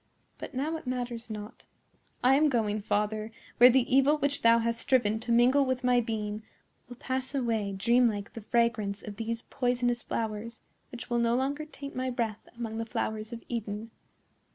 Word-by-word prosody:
"But - - -8
now 305 +5 -1
it 315 - -12
matters 245 -2 -4
not. 210 +1 -8 0.6
I 255 +2 +6
am 300 +2 +4
going, 215 -5 0
father, 210 +1 -1 0.3
where 245 +1 +10
the 255 0 +4
evil 275 +3 +5
which 285 0 +1
thou 230 0 +6
hast 230 0 0
striven 220 -5 +2
to 235 +1 -4
mingle 250 +4 +5
with 260 -1 -1
my 250 -1 +4
being 215 -2 -3 0.5
will 245 - -8
pass 260 +2 -3
away 230 -5 0
like 200 -1 -4
a - - -7
dream 240 +5 +4
like 205 -3 -4
the 225 - -7
fragrance 220 -2 0
of 205 -1 -8
these 230 +1 -3
poisonous 245 -1 0
flowers, 225 +1 -4 0.3
which 245 0 -9
will 240 - +2
no 235 0 +2
longer 280 +4 -1
taint 280 -2 -9
my 255 0 -1
breath 230 -4 -3
among 225 -1 -4
the 225 - -2
flowers 215 0 -3
of 235 -1 -7
Eden. 220 -1 -4
235 Hz, 190 wpm, -29 LUFS, 220-255 Hz, 0.6 s, where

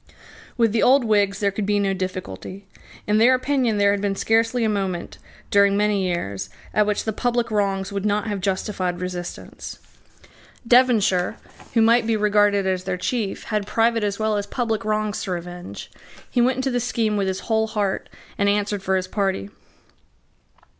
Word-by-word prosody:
With 230 -3 +3
the 220 - +1
old 270 +1 +5
Whigs 205 -3 +2
there 200 -1 +2
could 200 0 -3
be 205 0 +2
no 200 -1 +1
difficulty. 185 - -6 0.4
In 210 +1 +2
their 250 +3 +6
opinion 255 -4 0
there 200 0 +4
had 200 -1 -1
been 200 -1 0
scarcely 225 +3 +1
a - - +2
moment, 195 -4 -3 0.3
during 200 0 +4
many 205 -2 +1
years, 100 - -3 0.2
at 210 -1 +3
which 210 - 0
the 220 - -2
public 240 +1 -1
wrongs 195 -2 0
would 200 -1 -3
not 210 0 0
have 205 -3 -3
justified 185 -2 -2
resistance. 180 -1 -6 0.9
Devonshire, 220 -6 +3 0.4
who 225 - +5
might 230 0 +4
be 225 -1 +2
regarded 205 -1 +3
as 185 -1 -1
their 185 -1 -2
chief, 210 +1 -2
had 210 -1 0
private 230 0 +2
as 200 -1 -1
well 215 -1 0
as 205 0 -3
public 225 -4 -2
wrongs 215 0 -1
to 190 - -4
revenge. 175 +1 -7 0.4
He 245 - +2
went 255 +2 +3
into 260 +1 -1
the 245 - 0
scheme 225 -3 0
with 200 -2 0
his 190 0 -2
whole 220 -1 +1
heart, 205 -3 -2 0.3
and 200 0 +3
answered 205 0 0
for 190 0 0
his 185 0 -1
party. 190 - -2
205 Hz, 180 wpm, -22 LUFS, 195-225 Hz, 0.9 s, their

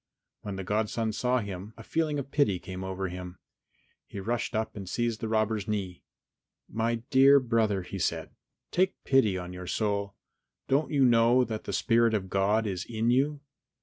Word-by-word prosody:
When 100 -2 -5
the 95 - -5
godson 110 +2 -1
saw 125 +2 +1
him, 100 +1 -7
a 115 - -10
feeling 155 +3 -1
of 140 -1 -5
pity 125 -11 +2
came 90 +1 -7
over 95 0 -3
him; 90 0 -7 0.7
he 100 - -7
rushed 115 +4 -2
up 110 0 -2
and 100 -3 -7
seized 120 -1 -1
the 115 - -2
robber's 110 -2 0
knee. 100 -4 -3 0.7
"My 115 +1 0 0.2
dear 135 +1 +7
brother," 110 -6 +1
he 95 +2 -6
said, 85 - -1 0.4
"take 185 +1 +2
pity 110 -8 +3
on 90 0 -6
your 90 0 -8
soul! 100 -1 -1 0.5
Don't 140 +3 +2
you 140 -3 +3
know 120 +1 +5
that 110 -3 -5
the - - -4
spirit 115 -2 +3
of 95 -3 -3
God 105 +3 +2
is 95 -4 -2
in 115 +1 0
you? 140 +3 +1
110 Hz, 180 wpm, -28 LUFS, 95-120 Hz, 0.7 s, dear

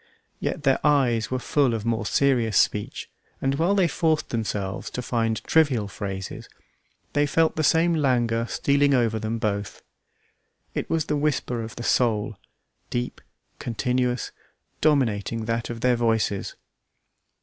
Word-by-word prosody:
Yet 150 - -3
their 135 -2 +3
eyes 130 -7 +2
were 130 - -1
full 130 -1 +1
of 110 -1 -4
more 115 -2 0
serious 120 -7 +2
speech, 105 -1 0 0.3
and 135 0 0
while 180 +5 +3
they 190 -3 +4
forced 155 0 0
themselves 105 -4 -3
to 125 - -4
find 115 -2 -1
trivial 135 -10 +2
phrases, 95 -2 -6 0.6
they 145 +1 +2
felt 160 +3 +2
the 155 - 0
same 165 +3 +4
languor 120 -6 +1
stealing 140 +1 +2
over 115 -3 +1
them 110 +1 -2
both. 100 -3 -3 0.9
It - - -3
was 160 -2 +1
the 150 - -1
whisper 140 -5 -1
of 110 0 -7
the 120 - -6
soul, 110 -4 +1 0.5
deep, 120 0 -3 0.4
continuous, 125 +1 -1 0.5
dominating 115 -7 +1
that 115 +1 -2
of 115 -1 -6
their 125 -1 +3
voices. 110 -4 0
120 Hz, 140 wpm, -25 LUFS, 110-140 Hz, 0.9 s, they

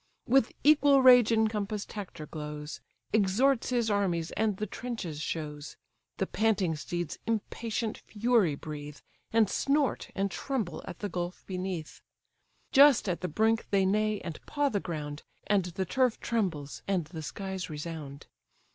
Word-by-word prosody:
With 255 -1 +3
equal 285 -2 +6
rage 245 -3 +8
encompass'd 215 -2 0
Hector 195 -7 -6
glows; 150 -1 -7 0.3
Exhorts 225 +6 +3
his 240 -3 +1
armies, 180 -5 0
and 215 -3 0
the 215 - -2
trenches 195 -9 -5
shows. 150 -2 -5 0.4
The 190 - 0
panting 200 -6 +1
steeds 175 +1 -4
impatient 225 0 -2
fury 220 -7 +2
breathe, 150 -1 -7 0.3
And 225 -1 +4
snort 280 +6 0
and 195 0 0
tremble 235 - -3
at 175 - -6
the 205 - -2
gulf 175 0 -4
beneath; 185 -4 -5 0.7
Just 280 -5 +7
at 180 -2 -1
the 180 - -1
brink 220 +7 +1
they 195 -1 +3
neigh, 210 +2 +1
and 165 - -7
paw 290 -1 +1
the 205 - 0
ground, 150 -5 -5 0.2
And 200 -3 +2
the 180 +2 -3
turf 255 +4 +1
trembles, 175 -11 -2
and 190 -5 +1
the 160 +1 -8
skies 190 +6 -5
resound. 150 -2 -6
195 Hz, 145 wpm, -30 LUFS, 165-225 Hz, 0.7 s, rage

